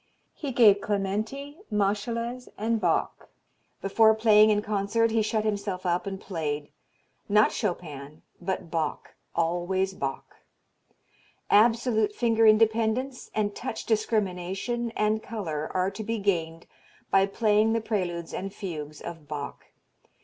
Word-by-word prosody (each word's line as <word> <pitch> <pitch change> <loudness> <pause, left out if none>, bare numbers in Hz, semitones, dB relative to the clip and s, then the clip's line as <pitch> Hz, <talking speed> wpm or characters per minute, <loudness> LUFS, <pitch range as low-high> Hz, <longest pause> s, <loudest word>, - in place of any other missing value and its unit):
He 285 -3 -5
gave 215 -5 +6
Clementi, 215 - -3
Moscheles 230 +5 -1
and 225 +1 0
Bach. 170 -3 0 0.5
Before 220 +3 +5
playing 215 -1 +6
in 210 -1 +2
concert 215 +2 +1
he 225 0 +2
shut 215 0 0
himself 200 -3 -2
up 175 +2 0
and 195 -1 -4
played, 150 -6 -4 0.6
not 210 +1 +5
Chopin 155 -7 -4 0.2
but 180 -2 -3
Bach, 160 -3 -3 0.2
always 175 +3 0
Bach. 135 -6 -5 1.1
Absolute 220 -1 +3
finger 225 -2 +3
independence 225 +4 +2
and 205 -1 0
touch 260 - -5
discrimination 215 +1 -1
and 215 +1 +1
color 165 -10 -4
are 185 +1 0
to 215 +2 -6
be 225 +2 -2
gained 170 -5 -1 0.5
by 195 0 +4
playing 215 +1 +2
the 230 - +2
preludes 175 -6 -3
and 195 +1 -4
fugues 155 -7 -6
of 165 -3 -8
Bach. 145 -2 -6
205 Hz, 125 wpm, -27 LUFS, 180-220 Hz, 1.1 s, gave